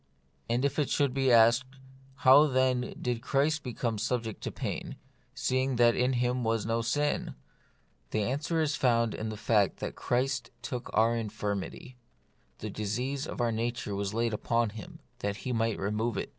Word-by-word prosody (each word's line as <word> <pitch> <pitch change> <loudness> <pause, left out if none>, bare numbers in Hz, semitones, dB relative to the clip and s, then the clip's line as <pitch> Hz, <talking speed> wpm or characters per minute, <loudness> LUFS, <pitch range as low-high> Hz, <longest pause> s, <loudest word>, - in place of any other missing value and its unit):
And 120 +3 +1
if 140 +2 0
it 145 - +1
should 140 -3 +1
be 135 -1 +2
asked, 120 +3 +5 0.5
How, 140 +4 +8
then, 130 -2 +1
did 120 -2 -2
Christ 145 +5 +1
become 115 -3 -3
subject 115 -1 -2
to - - -4
pain, - - -4 0.4
seeing 130 +1 0
that 120 -1 +5
in 125 +1 +2
Him 125 0 0
was 115 -1 0
no 115 +1 0
sin? 145 +6 -1 0.7
the 110 - 0
answer 145 +8 -1
is 150 -2 +1
found 115 -3 +2
in 110 - -4
the 110 - -5
fact 105 -2 +2
that - - -5
Christ 125 0 -1
took 120 0 -5
our 115 +2 +3
infirmity; 105 +2 -4 0.6
the 110 - -6
disease 125 +8 -2
of - - -6
our 120 -1 +2
nature 115 -1 -2
was 100 0 -2
laid 115 +1 0 0.2
on 115 -1 +3
Him, 105 -2 -10 0.2
that 100 0 -2
He 130 - -1
might 115 -1 0
remove 105 +2 -1
it. - - -3
120 Hz, 170 wpm, -29 LUFS, 110-130 Hz, 0.7 s, How